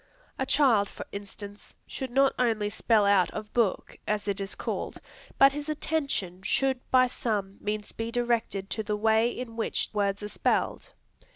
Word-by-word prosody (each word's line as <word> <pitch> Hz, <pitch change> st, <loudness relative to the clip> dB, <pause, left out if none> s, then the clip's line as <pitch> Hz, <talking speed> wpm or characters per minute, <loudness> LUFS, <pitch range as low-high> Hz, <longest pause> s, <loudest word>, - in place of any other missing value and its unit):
A 265 Hz, -, 0 dB
child, 235 Hz, -10 st, +4 dB
for -, -, -8 dB
instance, 205 Hz, 0 st, -8 dB
should 265 Hz, -, -5 dB
not 270 Hz, +2 st, +4 dB
only 220 Hz, -4 st, +1 dB
"spell 220 Hz, -1 st, +3 dB
out 200 Hz, -3 st, +4 dB
of 215 Hz, -1 st, -6 dB
book," 230 Hz, -6 st, 0 dB
as 210 Hz, -1 st, -1 dB
it 200 Hz, -1 st, -1 dB
is 195 Hz, 0 st, -3 dB
called, -, -, -4 dB, 0.4 s
but 275 Hz, 0 st, +7 dB
his 295 Hz, +2 st, -5 dB
attention 280 Hz, -, -2 dB
should 265 Hz, +6 st, +1 dB
by 255 Hz, -1 st, +6 dB
some 210 Hz, -5 st, -2 dB
means 210 Hz, 0 st, -3 dB
be 225 Hz, 0 st, -4 dB
directed 235 Hz, -5 st, -1 dB
to 220 Hz, -, -1 dB
the 210 Hz, 0 st, -2 dB
way 220 Hz, +2 st, +3 dB
in 245 Hz, -2 st, -6 dB
which 225 Hz, -, -1 dB
words 200 Hz, -1 st, 0 dB
are -, -, -3 dB
spelled. -, -, -1 dB
220 Hz, 170 wpm, -28 LUFS, 205-250 Hz, 0.4 s, but